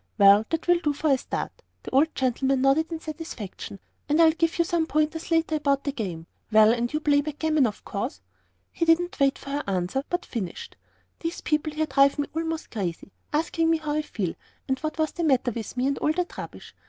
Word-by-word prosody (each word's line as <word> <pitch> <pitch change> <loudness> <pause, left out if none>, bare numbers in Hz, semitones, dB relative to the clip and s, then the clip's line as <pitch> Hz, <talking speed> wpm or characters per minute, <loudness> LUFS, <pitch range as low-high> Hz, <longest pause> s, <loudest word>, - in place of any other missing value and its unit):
"Well, 200 +1 +7
that 325 +1 -2
will 350 0 +5
do 300 -4 0
for 300 +1 0
a 270 - +5
start," - - -4 0.3
the - - -7
old 290 +5 +3
gentleman 265 +1 +1
nodded 310 +5 +3
in 325 - -3
satisfaction. 310 - -7 0.3
"And 300 +2 +3
I'll 325 -1 +7
give 330 0 0
you 340 - +3
some 330 -2 0
points 310 +2 0
later 325 -1 +2
on - - +3
about 280 -2 +1
the 285 - -1
game. 185 - -5 0.3
Well, 215 +1 +7
and 240 0 -1
you 305 - 0
play 290 -1 +3
backgammon, 305 -1 +1
of 210 - -7
course." 200 - -4 0.5
He - - -2
didn't 335 +1 +2
wait 275 -1 +3
for 275 - -9
her 290 +1 -1
to - - -7
answer, 185 +8 -1
but 355 0 -2
finished, 200 -8 -5 0.4
"These 330 0 -4
people 305 0 0
here 310 +1 0
drive 275 0 +4
me 290 - -1
almost 325 0 -3
crazy, 195 -3 -4 0.2
asking 325 +1 +1
me 330 - +4
how 310 -1 -4
I 305 - +1
feel, 195 - -3 0.3
and 265 -1 0
what 310 0 -4
was 315 -1 +1
the 345 - -4
matter 260 -5 +2
with 230 +2 -6
me, 250 - +1
and 275 0 0
all 305 - +2
that 360 +1 -2
rubbish. - - -9
295 Hz, 225 wpm, -26 LUFS, 250-320 Hz, 0.5 s, Well